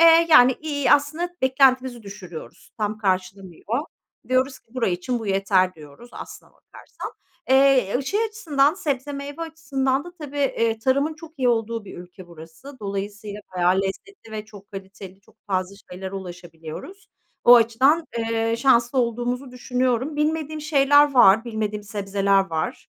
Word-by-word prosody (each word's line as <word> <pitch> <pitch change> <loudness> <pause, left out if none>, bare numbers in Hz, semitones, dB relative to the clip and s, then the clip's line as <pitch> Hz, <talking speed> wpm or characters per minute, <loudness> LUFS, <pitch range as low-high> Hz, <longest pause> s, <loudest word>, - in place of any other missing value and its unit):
Eee, 330 0 +7
yani, 255 -4 +8
iii, 285 -4 -1
aslında 310 +5 +1
beklentimizi 260 -2 +2
düşürüyoruz, 195 -5 -11
tam 215 0 -2
karşılamıyor. 190 +1 -2 0.5
Diyoruz 260 +1 +1
ki 230 - -30
bura 255 - 0
için 185 +8 -2
bu 225 - -7
yeter 195 -1 +2
diyoruz 150 +9 -14
aslına - - -11
bakarsan. - - -11 0.4
Eee, 265 -6 +4
ı - - -3
şey 410 +11 0
açısından, 315 -10 +1
sebze 285 -5 -3
meyve 280 +2 -7
açısından 275 -4 -2
da 350 - -10
tabii, 290 -1 -7
eee, 230 -5 0
tarımın 280 +6 +1
çok 320 0 -14
iyi 255 -2 +2
olduğu 230 -1 -1
bir 195 - -10
ülke 180 +1 -12
burası. 170 - -13
Dolayısıyla 205 +1 -5 0.2
bayağı 180 +1 +3
lezzetli 225 - -7
ve 215 -1 -5
çok 205 -2 -15
kaliteli, 195 -1 -10
çok 205 - -26
fazla 185 -1 -2 0.2
şeylere 190 +1 -7
ulaşabiliyoruz. 175 - -9 0.4
O 245 - +9
açıdan, 260 +8 +3
eee, 225 0 0
şanslı, 245 -1 +3
olduğumuzu 245 +2 -1
düşünüyorum. 250 +2 -1
Bilmediğim 310 0 -1
şeyler 290 -1 +4
var. 225 -2 +6
Bilmediğim 215 -3 -3
sebzeler 200 -1 0
var 160 -1 -4
235 Hz, 145 wpm, -23 LUFS, 195-280 Hz, 0.5 s, O